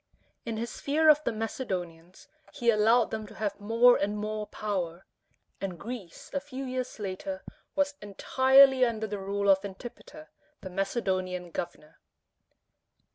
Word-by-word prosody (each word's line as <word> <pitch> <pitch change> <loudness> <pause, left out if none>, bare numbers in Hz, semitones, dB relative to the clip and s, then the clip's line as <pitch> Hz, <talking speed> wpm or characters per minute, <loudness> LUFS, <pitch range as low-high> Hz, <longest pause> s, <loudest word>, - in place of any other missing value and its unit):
In 225 -1 -2
his 235 +2 -5
fear 310 +3 +3
of 300 0 +6
the - - +1
Macedonians, 185 -7 -5 0.2
he 240 -4 +2
allowed 225 +2 +4
them 220 -1 -4
to - - -13
have 205 -2 -3
more 230 +4 +5
and 205 +1 -1
more 215 0 -3
power; 190 -5 -3 0.6
and 190 -3 -4
Greece 225 -7 -8
a 280 - +1
few 275 -1 -7
years 255 -1 -4
later 235 +9 -5 0.3
was 285 0 +1
entirely 260 +6 +5
under 225 -3 0
the 205 -1 -4
rule 200 +1 -2
of 195 0 +5
Antipater, 240 +9 -10 0.3
the 190 - -7
Macedonian 185 -3 -2
governor. 155 -2 -6
215 Hz, 140 wpm, -29 LUFS, 195-255 Hz, 0.6 s, of